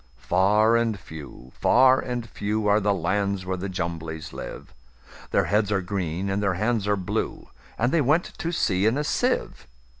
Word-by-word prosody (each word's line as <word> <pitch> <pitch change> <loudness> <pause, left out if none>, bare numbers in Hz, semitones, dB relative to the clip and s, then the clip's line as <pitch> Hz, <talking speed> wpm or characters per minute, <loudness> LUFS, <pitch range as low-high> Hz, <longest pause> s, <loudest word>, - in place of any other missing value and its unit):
Far 105 - +3
and 115 -3 +1
few, 75 -6 -11
far 130 +1 +5
and 120 -2 -4
few, 105 0 -2
Are 105 +1 +4
the 105 0 +1
lands 100 +1 -1
where 95 0 -1
the 95 +2 -4
Jumblies 80 -3 -5
live:Their - - -6
heads 105 0 +1
are 100 -1 +1
green, 90 -1 -3
and 100 +1 -1
their 95 -2 +1
hands 105 +1 0
are 105 0 +2
blue; 100 +4 -3 0.3
And 120 +3 +1
they 165 - +3
went 150 +6 +3
to 170 - -2
sea 100 - +1
in 115 +5 +2
a 150 - 0
sieve. 150 - -1
100 Hz, 175 wpm, -25 LUFS, 90-110 Hz, 0.3 s, far